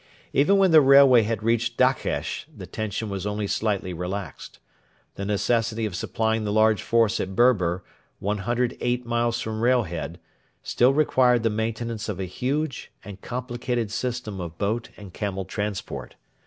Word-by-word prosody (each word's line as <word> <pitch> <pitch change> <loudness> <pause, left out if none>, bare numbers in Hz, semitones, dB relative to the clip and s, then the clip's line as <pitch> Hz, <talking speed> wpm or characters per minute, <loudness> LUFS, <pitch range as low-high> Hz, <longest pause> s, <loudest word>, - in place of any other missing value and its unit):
Even 155 +9 +4
when 190 -2 +4
the 160 -1 +8
railway 135 -3 +7
had 110 -1 -2
reached 120 +1 0
Dakhesh 130 +1 0
the - - -10
tension 110 0 -4
was 100 -1 -4
only 105 0 -2
slightly 100 -3 -1
relaxed. 90 +3 -6 0.6
The 100 - -5
necessity 110 +2 0
of 105 - -4
supplying 110 +4 -1
the 105 - -2
large 110 -1 +3
force 115 -2 +2
at 95 0 -4
Berber, 95 -8 +3 0.3
108 120 +4 -1
miles 120 0 0
from 110 0 -4
Railhead, 95 -9 0 0.4
still 125 +2 +3
required 125 -5 +3
the 115 - +2
maintenance 110 0 -3
of 100 -3 -4
a 95 - -2
huge 135 - -3
and 100 -2 -9
complicated 120 -2 -3
system 120 -4 -3
of 85 -1 -7
boat 110 +3 -2
and 100 -4 -11
camel 95 -2 -3
transport. 105 0 -5
110 Hz, 150 wpm, -25 LUFS, 100-120 Hz, 0.6 s, the